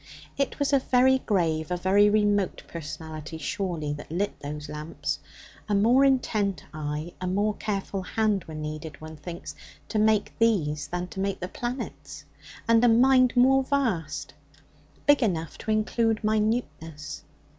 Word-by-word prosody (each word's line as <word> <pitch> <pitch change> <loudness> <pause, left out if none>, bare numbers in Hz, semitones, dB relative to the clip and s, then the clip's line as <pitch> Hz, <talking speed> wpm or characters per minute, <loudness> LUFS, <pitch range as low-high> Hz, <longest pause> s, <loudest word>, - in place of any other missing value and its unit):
It 275 - -1
was 285 0 0
a 275 - +6
very 260 +1 +4
grave, 165 -8 0
a 180 - 0
very 195 +3 +4
remote 205 -2 +1
personality, 160 0 -7
surely, 160 -2 -2
that 145 +1 -9
lit 195 +5 -2
those 150 +1 -6
lamps. 150 +1 -4 0.5
A 205 - +2
more 235 +7 +5
intent 210 - +1
eye, 150 +2 -4
a 185 - -2
more 205 +3 +1
careful 195 -2 -3
hand 210 0 0
were 160 - -8
needed, 155 0 -6
one 155 0 -9
thinks, 170 +3 -8 0.4
to 215 - 0
make 215 -1 +2
these 155 -11 +2
than 175 +3 -3
to 190 - -7
make 195 0 -1
the 180 - -4
planets, 245 +6 -6 0.4
and 230 0 +5
a - - +7
mind 255 +2 +5
more 265 +2 +6
vast, 235 - -1 0.7
big 290 -1 +5
enough 165 -8 -1
to - - -7
include 220 +1 +1
minuteness. 210 -9 -1
200 Hz, 150 wpm, -26 LUFS, 160-225 Hz, 0.7 s, a